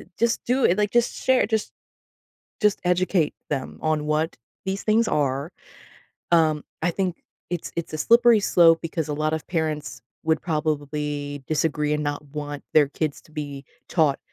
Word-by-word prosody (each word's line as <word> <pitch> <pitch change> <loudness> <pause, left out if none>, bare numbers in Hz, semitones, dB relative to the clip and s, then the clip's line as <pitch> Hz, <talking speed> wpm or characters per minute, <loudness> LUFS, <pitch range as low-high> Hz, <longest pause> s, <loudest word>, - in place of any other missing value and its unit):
i - - -13
just 235 0 +1
do 255 +2 +1
it, 175 - +4
like, 210 -1 +2
just 240 0 +2
share, 260 -4 +2
just 220 -1 -1 0.9
just 210 -1 +3
educate 180 -3 +2 0.2
them 135 -3 -3
on 155 -1 0
what 155 +2 0 0.3
these 190 +1 -2
things 220 +1 +3
are, 140 +1 0 0.8
um, 155 -3 +3 0.2
I 175 - +2
think 180 -1 -2 0.3
it's 175 -2 -4
it's 170 -2 -4
a 155 - -2
slippery 235 +4 +5
slope 165 -4 +5
because 165 -2 -3
a 150 - -2
lot 155 +1 0
of 160 - -3
parents 155 -8 -2 0.2
would 160 -1 +1
probably 150 -2 -2
disagree 150 -1 0
and 150 0 -1
not 145 0 -2
want 145 0 -6
their 150 -2 +6
kids 150 0 -2
to 155 - -21
be 145 -3 -6 0.2
taught, 155 -5 +2
155 Hz, 170 wpm, -24 LUFS, 150-180 Hz, 0.9 s, their